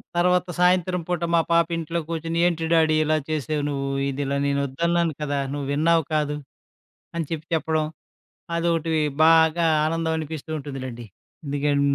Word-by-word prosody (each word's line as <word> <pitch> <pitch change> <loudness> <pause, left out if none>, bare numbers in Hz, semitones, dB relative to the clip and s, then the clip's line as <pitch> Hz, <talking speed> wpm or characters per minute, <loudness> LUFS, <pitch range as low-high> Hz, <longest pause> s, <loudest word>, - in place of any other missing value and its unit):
తర్వాత 180 +1 +3
సాయంత్రం 180 0 +3
పూట 175 -2 -1
మా 165 - +5
పాప 170 -1 +4
ఇంట్లో 165 +1 -2
కూర్చొని 165 0 -2
ఏంటి 165 -2 -1
డాడీ 160 -1 +4
ఇలా 155 0 +2
చేసావు 155 -1 -1
నువ్వు. 140 -1 -2 0.2
ఇది 140 +1 -3
ఇలా 140 +1 -1
నేను 140 0 +1
వద్దన్నాను 170 +4 0
కదా! 145 -1 -1
నువ్వు 145 -1 -4
విన్నావు 165 +2 +3
కాదు, 150 -1 +1 0.8
అని 165 -4 -2
చెప్పి 160 -1 -4
చెప్పడం. 155 -1 0 0.7
అదొకటివి 165 -2 +1 0.2
బాగా 160 +1 +5 0.2
ఆనందం 165 0 -1
అనిపిస్తూ 160 0 -6
ఉంటుందిలెండి. 130 -4 -6 0.5
దిగెం 145 0 +1
160 Hz, 145 wpm, -24 LUFS, 145-170 Hz, 0.8 s, మా